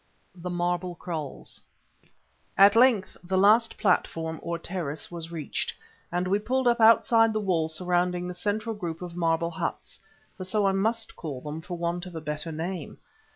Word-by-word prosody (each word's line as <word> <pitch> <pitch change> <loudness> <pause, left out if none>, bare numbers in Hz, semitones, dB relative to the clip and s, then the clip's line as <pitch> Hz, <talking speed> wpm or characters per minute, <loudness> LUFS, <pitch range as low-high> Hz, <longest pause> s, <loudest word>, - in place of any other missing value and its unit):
THE 180 0 -7
MARBLE 175 0 -1
KRAALS 160 -5 -6 1.0
At 200 +2 +7
length 230 -5 +4
the 190 +2 -1
last 215 +4 +4
platform, 160 -4 0
or 170 0 -3
terrace, 165 -4 -4
was 170 -1 -6
reached, 160 -4 -3 0.4
and 175 +1 0
we 200 +2 +2
pulled 255 +4 0
up 235 0 +3
outside 225 0 +6
the 215 - 0
wall 180 -6 +1
surrounding 180 +2 0
the 180 - -4
central 210 +5 -2
group 175 -5 -5
of 175 -1 -7
marble 170 -1 +1
huts—for 195 +2 -7
so 200 +2 +1
I 195 - +4
must 225 +4 -1
call 145 -6 -5
them, 150 +3 -6
for 175 +1 -6
want 175 +1 -2
of 180 - -10
a - - -3
better 150 +2 -4
name. 165 0 -5
180 Hz, 165 wpm, -27 LUFS, 165-200 Hz, 1.0 s, At